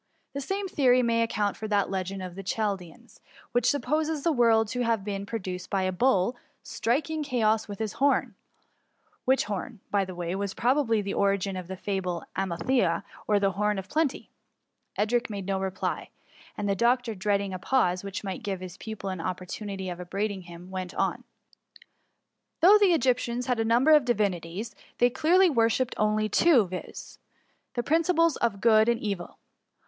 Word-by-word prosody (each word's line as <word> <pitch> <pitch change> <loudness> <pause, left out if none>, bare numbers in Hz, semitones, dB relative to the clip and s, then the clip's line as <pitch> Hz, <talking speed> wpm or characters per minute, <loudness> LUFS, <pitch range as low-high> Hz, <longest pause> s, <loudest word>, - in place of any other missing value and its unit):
The 280 - -3
same 390 +7 -2
theory 255 -7 +3
may 230 -1 +2
account 210 -3 0
for 220 - -5
that 205 -2 +1
legend 190 0 -3
of 180 -1 -6
the 195 - -7
Chaldeans 200 +1 -4 0.3
which 245 -1 +2
supposes 300 +3 0
the 335 - +3
world 230 -5 +4
to 250 +1 -2
have 230 -4 +1
been 200 -1 -4
pro 230 - -2
duced 185 -2 -6
by 195 -1 0
a 185 - 0
bull's 195 +1 +2 0.3
striking 305 +6 -1
chaos 225 -6 +1
with 205 -1 -7
his 220 -1 -3
Horn 280 +1 +1 0.5
— - - -41
which 265 +1 +3
horn, 205 +3 -5
by 200 -1 +2
the 185 -1 -7
way, 175 0 -3
was 195 0 -3
probably 240 -4 +2
the 200 - -3
ovigin 200 -1 +1
of 185 -2 -6
the 190 0 -6
fable 185 -3 -3
of - - -18
Amalthea, 185 0 0 0.2
or 210 -1 +3
the 195 -1 +2
Horn 210 +2 0
of 190 0 -6
Plenty/' 310 -3 -1 0.7
Edric 235 +4 0
made 200 -3 -5
no 195 0 -1
reply, 190 -1 -3 0.5
and 205 - -2
the 200 - +2
doctor 240 +2 +2
dread 200 +1 +1
ing 195 -1 -4
a 185 - -4
pause, 185 -5 +1
which 200 0 -5
might 190 -2 -4
give 195 -2 -3
his 185 0 -8
pupil 205 -3 -6
an 185 -3 -5
op 180 - -3
portunity 190 0 -5
of 175 - -7
upbraiding 195 +2 -3
him, 175 +1 -11
went 185 -1 -5
on: - - -1 0.7
— - - -49
Though 405 +5 +8
the 395 -4 +5
Egyptians 250 -4 +1
had 250 -2 0
a - - +2
number 240 +7 +4
of 300 -4 +6
divinities, 200 -3 -1 0.2
they 245 0 +4
clearly 345 +7 +4
worshipped 230 0 +2
only 215 0 +1
two, 255 - +4
viz. 185 0 -8 0.6
the 240 - -1
principles 330 +1 +3
of 205 -4 -1
good 220 -1 +5
and 235 -1 +1
evil. 200 -4 -4
210 Hz, 185 wpm, -27 LUFS, 190-245 Hz, 0.7 s, Though